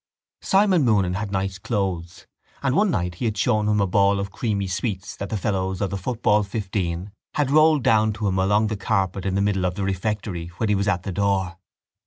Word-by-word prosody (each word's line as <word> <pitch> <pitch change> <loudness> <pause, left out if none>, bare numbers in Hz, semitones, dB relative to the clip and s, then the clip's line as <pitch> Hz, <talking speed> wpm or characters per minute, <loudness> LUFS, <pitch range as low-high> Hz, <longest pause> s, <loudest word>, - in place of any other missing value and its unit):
Simon 190 -4 +3
Moonan 100 -7 +2
had 100 +1 -3
nice 95 0 -2
clothes 95 -5 -3 0.4
and 130 -1 +1
one 205 +2 +3
night 90 - -1
he - - 0
had 110 -2 -1
shown 105 0 +1
him 105 0 +2
a 100 - +3
ball 100 +1 +3
of 100 0 -4
creamy 100 -2 -1
sweets 95 +1 -3
that 100 - -6
the 110 - -2
fellows 95 -2 -1
of 100 -2 -1
the 100 - -2
football 105 0 +1
fifteen 95 -3 -3 0.2
had 145 -2 +1
rolled 155 -2 +5
down 110 -1 +3
to 105 0 -2
him 95 -1 0
along 105 +3 +3
the 110 0 -1
carpet 95 -2 -1
in 95 - -1
the 100 - +1
middle 100 -2 +1
of 90 -1 0
the 100 - -3
refectory 95 -2 -2
when 110 - -1
he - - +3
was 100 +1 0
at 95 -3 0
the 100 - -4
door. 95 -2 0
100 Hz, 220 wpm, -23 LUFS, 95-110 Hz, 0.4 s, rolled